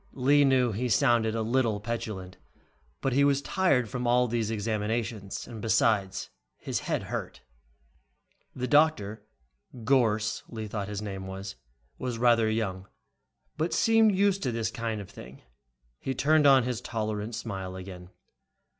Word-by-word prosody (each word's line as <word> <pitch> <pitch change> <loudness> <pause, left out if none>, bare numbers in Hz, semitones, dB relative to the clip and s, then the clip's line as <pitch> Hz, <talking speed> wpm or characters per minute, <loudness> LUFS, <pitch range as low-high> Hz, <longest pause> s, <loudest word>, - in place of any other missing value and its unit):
Lee 140 +3 +4
knew 130 -3 +3
he 120 +4 -2
sounded 115 -3 +3
a 115 - -1
little 115 -2 +1
petulant, 105 -5 -5 0.6
but 135 - 0
he 140 +2 +4
was 140 -1 +3
tired 140 - +1
from 125 +1 -3
all 125 +1 +3
these 115 -2 -1
examinations, 110 -1 -3
and 110 -2 -8
besides, 110 -4 +1 0.3
his - - -3
head - - -2
hurt. - - -5 1.1
The 125 - -2
doctor, 135 -9 +2 0.6
Gorss, 110 -4 +2
Lee 110 -2 -6
thought 100 -1 -4
his 105 0 -5
name 95 -2 -6
was, 95 -3 -7 0.4
was 125 -2 -3
rather 115 -2 +4
young 95 -4 -2 0.7
but 160 +3 0
seemed 225 -2 +4
used 195 0 +2
to 125 - -1
this 115 -1 -2
kind 115 -2 -3
of 100 - -10
thing. 65 -7 -12 0.6
He 135 - -3
turned 150 +2 +4
on 135 -2 +6
his 125 -1 -3
tolerant 110 -1 -3
smile 95 -5 -5
again. 90 -1 -9
115 Hz, 145 wpm, -28 LUFS, 105-130 Hz, 1.1 s, on